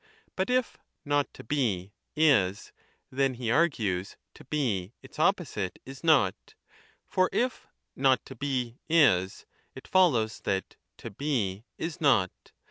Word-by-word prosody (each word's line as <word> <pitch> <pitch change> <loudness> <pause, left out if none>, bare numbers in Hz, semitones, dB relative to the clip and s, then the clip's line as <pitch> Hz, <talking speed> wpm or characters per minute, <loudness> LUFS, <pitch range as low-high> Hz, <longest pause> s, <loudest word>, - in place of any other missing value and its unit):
But 190 +4 -1
if 255 -1 0 0.3
Not 145 -1 +1
to - - -10
Be 110 -8 -1 0.2
is, 105 -11 +2 0.4
then, 135 0 +1
he 120 -2 -2
argues, 110 - 0 0.2
To - - -14
Be, 120 -9 -1
its 135 - -13
opposite, 155 - 0
is 135 +3 -10
not; 140 - +2 0.5
for 185 0 +2
if 250 0 -1 0.3
Not 130 -2 +2
to 135 - -10
Be 125 -2 -3
is, 95 - +3 0.3
it - - -11
follows 125 -13 +3
that 95 -1 -2 0.2
To - - -8
Be 110 -5 -2
is 165 -1 -5
not. 105 - +4
130 Hz, 130 wpm, -28 LUFS, 100-150 Hz, 0.5 s, not